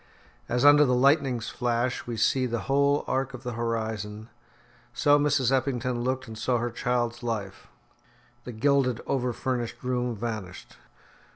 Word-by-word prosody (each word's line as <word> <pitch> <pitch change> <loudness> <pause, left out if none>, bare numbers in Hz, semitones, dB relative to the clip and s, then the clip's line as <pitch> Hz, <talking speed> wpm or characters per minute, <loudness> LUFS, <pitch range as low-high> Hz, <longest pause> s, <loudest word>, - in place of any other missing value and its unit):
As 125 +3 +1
under 145 +1 +8
the 125 -3 +2
lightning's 135 -3 +2
flash 120 0 -1
we 120 -2 -4
see 130 +4 +2
the 120 -1 -2
whole 140 +1 +2
arc 135 0 -1
of 130 - -11
the 125 - -4
horizon, 110 -2 -4 0.6
so 145 0 +4
Mrs. 145 -3 +2
Eppington 125 -2 0
looked 130 +1 -2
and 110 - -8
saw 120 +3 0
her 120 +1 -2
child's 120 -1 -1
life. 105 -5 -4 0.8
The 125 - -7
gilded, 130 0 +1
over 125 -2 0
furnished 120 -1 -3
room 125 -1 -1
vanished. 105 -5 -6
125 Hz, 150 wpm, -27 LUFS, 115-130 Hz, 0.8 s, under